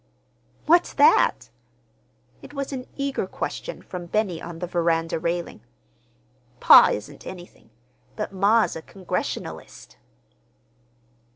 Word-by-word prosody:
"What's 345 +3 +3
that?" 450 - +3 0.9
It 290 - -13
was 275 0 -4
an 255 -1 -6
eager 275 -8 -2
question - - -6
from 180 -2 -8
Benny 195 -3 -1
on 170 -1 -8
the 180 - -4
veranda 165 -2 0
railing. 170 -7 -3 1.0
"Pa - - +8
isn't 105 0 -7
anything, 175 -9 -11 0.5
but 210 -2 -5
ma's 205 +4 +2
a 160 - -6
Congregationalist." 160 - -6
185 Hz, 105 wpm, -24 LUFS, 170-250 Hz, 1.0 s, Pa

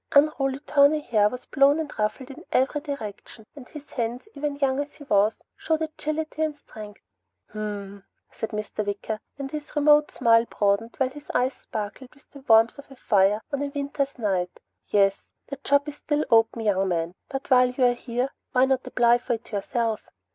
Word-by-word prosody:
Unruly 280 -2 +3
tawny 295 +1 +4
hair 215 -7 +2
was 250 +2 -8
blown 280 +1 +4
and 315 -2 -4
ruffled 250 +5 -2
in 305 +5 -11
every 270 +3 +1
direction 225 -6 -7
and 265 -4 -11
his 295 -2 -10
hands, 240 0 -3
even 290 0 -3
young 275 -1 +1
as 290 0 -4
he 290 - -12
was, 210 -4 +2
showed 320 -1 -1
ability 310 0 -4
and 310 -2 -1
strength. 210 -6 -11 0.5
"Hm 215 - -7
mm," 200 -1 -6 0.3
said 225 - -3
Mr. 215 0 -4
Wicker, 205 +1 -3 0.2
and 275 -1 -5
his 300 -1 -7
remote 295 0 +5
smile 230 0 +4
broadened 210 +1 0
while 260 -1 +1
his 295 +2 -13
eyes 255 +2 +2
sparkled 220 +4 -7
with 280 - -24
the 280 - -12
warmth 225 +4 +5
of 280 - -12
a 270 - -13
fire 205 -2 +2
on 280 - -1
a 285 - -1
winter's 280 -1 -3
night. 190 -6 0
"Hm - - -17
mm. - - -35
Yes. 195 -1 +3 0.3
The 280 - -5
job 285 +1 +3
is 295 - -6
still 300 0 -1
open, 225 0 +4
young 195 -2 +2
man, 170 -1 -1 0.2
but 270 0 -6
while 250 -1 +6
you're 250 -1 +3
here, 245 +2 -3 0.2
why 255 +1 +5
not 265 -1 0
apply 240 0 +4
for 245 - -2
it 225 0 -7
yourself?" 220 +2 -2
250 Hz, 195 wpm, -25 LUFS, 215-285 Hz, 0.5 s, while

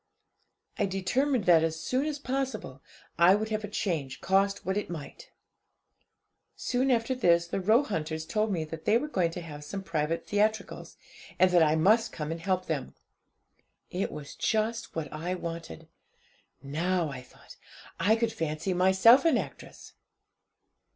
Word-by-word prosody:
'I 205 - +2
determined 230 +7 0
that, 170 -3 +5
as 160 0 -1
soon 255 - -1
as 300 -2 -2
possible, 265 - -4 0.4
I 175 +3 +7
would 215 +1 -2
have 215 0 -2
a - - -3
change, 165 -10 -3
cost 195 +1 +1
what 190 +1 -1
it 205 - -2
might. 175 - -8 1.3
'Soon 255 +2 0
after 235 0 +2
this 170 -9 +3
the 170 - -3
Roehunters 180 - +1
told 215 +5 0
me 170 -4 -1
that 160 0 -8
they 225 - +4
were 290 +5 -3
going 185 - +1
to 170 +2 -7
have 150 -3 -9
some 195 +6 -6
private 165 -1 -2
theatricals, 215 +1 -1 0.4
and 185 0 +4
that 175 -1 +5
I 155 -1 +4
must 215 +8 +3
come 150 -1 -5
and 165 0 -5
help 185 0 0
them. 150 -5 -4 1.0
It 185 +2 -2
was 145 -1 -8
just 225 +1 -1
what 160 -2 -3
I 170 +4 -3
wanted. 165 - -7 0.8
Now, 165 +4 -1
I 130 -2 -7
thought, 125 - -17 0.4
I 205 +6 +4
could 230 0 -1
fancy 160 +3 -2
myself 190 +8 +6
an 330 - +4
actress. - - -8
185 Hz, 155 wpm, -28 LUFS, 160-220 Hz, 1.3 s, I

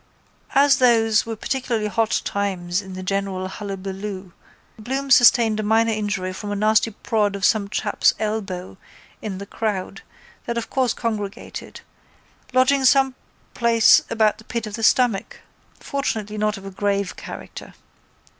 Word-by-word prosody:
As 280 +1 +5
those 225 -3 +3
were 225 - -3
particularly 235 -1 -2
hot 220 +1 0
times 185 -2 -2
in 190 -1 -10
the 185 0 -6
general 195 -1 -2
hullaballoo 195 -1 -6 0.5
Bloom 270 +5 -3
sustained 230 -3 +6
a - - +1
minor 225 +2 +2
injury 205 -4 -2
from 205 +2 -6
a - - -1
nasty 215 +2 +3
prod 210 -1 -1
of 195 -2 -1
some 205 -2 +2
chap's - - +2
elbow 195 -4 -4 0.4
in 200 -3 -5
the 200 - -7
crowd 205 -3 -3 0.5
that 235 0 -2
of 230 - -4
course 255 -3 +1
congregated 210 -4 -5 0.7
lodging 260 +2 +3
some 265 0 +4 0.4
place 230 -2 +5
about 220 -1 +2
the - - -13
pit 235 0 -4
of 215 - -8
the 225 - -5
stomach, 225 -3 +2 0.4
fortunately 220 -7 -3
not 210 0 0
of 195 - -11
a 195 - -7
grave 200 -1 -1
character. - - -9
215 Hz, 145 wpm, -22 LUFS, 195-230 Hz, 0.7 s, sustained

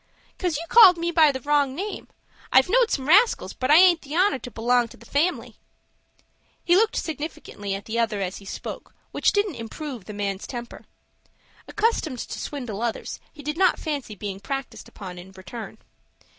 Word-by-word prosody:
"'Cause 355 -5 0
you 325 - -5
called 375 -4 +8
me 340 +1 -1
by 320 -3 +5
the 260 -1 -6
wrong 285 -1 +1
name. 395 +6 -5 0.4
I've 260 - +6
knowed 480 +2 +4
some 265 -8 -2
rascals, 415 +9 +4
but 255 - -3
I 300 - +7
aint 350 -1 +6
the 295 +1 -7
honor 375 -3 +3
to 245 - -8
belong 240 +1 +1
to - - -15
the - - -17
family." 320 +6 -1 1.1
He 350 - +4
looked 435 +3 +3
significantly 300 -10 -5
at 195 - -8
the 230 +1 -2
other 220 -3 0
as 190 -1 -3
he 200 - -13
spoke, - - -8 0.2
which - - +2
didn't 405 - 0
improve 245 -1 -7
the 210 - -8
man's 200 -1 -3
temper. 240 -2 -8 0.8
Accustomed 420 - 0
to - - -6
swindle 245 -8 -5
others, 235 -1 -3
he 295 - -13
did 300 +4 -4
not 375 - +4
fancy 285 -8 -4
being 195 -1 -6
practised 270 +6 -6
upon 180 -3 -9
in 190 +2 -13
return. 195 +3 -9
275 Hz, 185 wpm, -24 LUFS, 220-340 Hz, 1.1 s, called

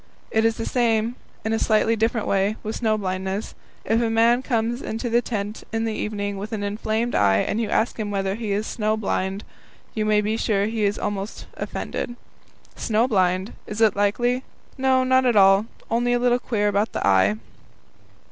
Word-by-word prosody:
It 220 0 +2
is 225 0 +2
the 225 - -3
same, 230 -1 +1 0.3
in 220 - 0
a 225 - +1
slightly 220 +1 +3
different 225 0 0
way, 200 +2 +1
with 215 0 -3
snow 220 -2 +1
blindness. 190 +1 -3 0.3
If 225 +1 +2
a 230 - +1
man 230 +2 +4
comes 240 -1 -1
into 230 +2 -4
the 240 +1 +4
tent 210 -3 -4
in 225 0 -1
the 225 - -1
evening 205 -2 -3
with 210 +3 -6
an 205 -2 -2
inflamed 220 +3 -1
eye 100 -1 +4
and 215 - 0
you 220 - -2
ask 225 +2 0
him 210 -1 -2
whether 195 -1 -1
he 220 -1 -4
is 205 +2 0
snow 215 -1 -1
blind, 195 -1 -2 0.5
you 215 - -1
may 215 0 +3
be 215 +2 -1
sure 200 -3 +1
he 220 -1 -1
will 200 - +2
be - - -9
almost 200 0 -4
offended. 240 - -4 0.6
"Snow 225 +2 +1
blind? 185 -2 +1
Is 210 - -5
it 220 -3 +4
likely? 240 +5 +1 0.3
No, 260 -1 +2
not 260 0 +3
at 240 - +2
all, 195 +1 +6 0.2
only 240 +1 +2
a 245 - +2
little 245 0 +3
queer 210 -4 0
about 205 +2 0
the - - -2
eye." 95 +1 +4
220 Hz, 195 wpm, -23 LUFS, 205-230 Hz, 0.6 s, all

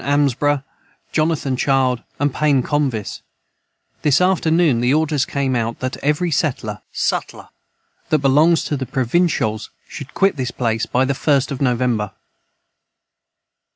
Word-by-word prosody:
Armsba 145 0 +1 0.5
Jonathan 155 -4 0
Child 130 -2 +1 0.2
and 145 -1 +1
Pain 145 -4 +2
Convis 135 -8 -2 0.8
this 145 -2 +3
after 180 -2 +2
noon 160 -7 +3
the 125 +1 +2
orders 155 -2 +1
came 135 -2 -1
out 115 -1 -2
that 130 0 -3
every 150 +4 0
setler 115 - -1 1.3
that 155 - +4
Belongs 150 +4 +3
to 150 - -2
the 130 -2 -4
Provinshols 125 -4 0 0.2
should 140 -2 -9
Quit 195 -5 +2
this 125 -2 -2
place 115 -2 -1
by 130 +1 +1
the 140 - 0
first 140 0 +1
of 140 - -5
November. 120 -5 0
140 Hz, 130 wpm, -19 LUFS, 125-150 Hz, 1.3 s, that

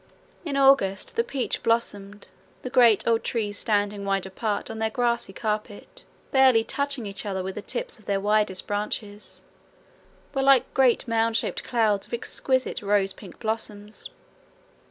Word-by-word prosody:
In 290 -5 -2
August 270 -9 +3
the 465 - +2
peach 270 - -2
blossomed. 205 -3 -1 0.3
The 255 - -5
great 235 -5 +5
old 230 -1 +2
trees 205 -3 -2
standing 205 -2 0
wide 195 -1 0
apart 205 +3 -3
on 220 - -6
their 220 0 +1
grassy 235 -2 0
carpet, 210 +1 -5 0.3
barely 260 -4 +5
touching 280 0 -2
each 200 -1 -5
other 190 -3 -3
with 190 +1 -4
the 210 - -6
tips - - -4
of 215 - -20
their 200 -1 0
widest 210 -2 +1
branches, 205 0 -3 0.9
were 270 - 0
like 270 -2 +4
great 260 0 +3
mound 230 0 +2
shaped - - -2
clouds 215 -4 +1
of - - -3
exquisite 260 +2 -1
rosy 200 -1 +2
pink 190 -3 -12
blossoms. 215 -2 -4
220 Hz, 155 wpm, -25 LUFS, 205-245 Hz, 0.9 s, great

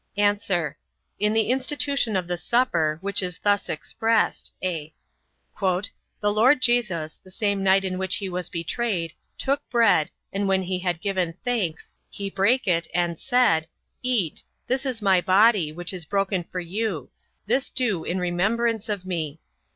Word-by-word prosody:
A. 205 -5 +1 0.4
In 210 +1 +3
the 220 +1 +2
institution 270 -3 +1
of 180 -2 -1
the 180 - -1
supper, 170 -7 +1
which 200 +1 +1
is 180 -2 -3
thus 205 0 +1
expressed: 225 +8 0
(a) 160 -4 -3 0.7
"The 185 0 +1 0.4
Lord 220 +7 +4
Jesus, 200 -11 0
the 185 - -15
same 200 0 -1
night 195 0 +4
in 185 -1 -2
which 190 -1 +2
he 200 - -2
was 180 -1 -3
betrayed, 170 0 -2 0.2
took 280 +1 0
bread, 225 -10 +4 0.2
and 200 +1 0
when 190 -1 +2
he 185 0 -2
had 175 -2 -2
given 185 -4 -1
thanks, 210 -10 -2 0.2
he 200 -1 -5
brake 230 +7 +2
it, 170 -2 +2
and: 175 -2 0
said: 245 -12 +3 0.3
eat, 235 -11 0 0.2
this 265 +2 0
is 235 -5 -2
my 190 -3 +4
body, 190 -2 +4
which 175 +3 -4
is 180 -2 -4
broken 195 +1 0
for 180 - -5
you; 180 - -3 0.3
this 250 +6 +1
do 225 -10 0
in 180 - -2
remembrance 215 +6 0
of 200 -3 -2
me. 160 -4 -3
195 Hz, 160 wpm, -24 LUFS, 175-225 Hz, 0.7 s, Lord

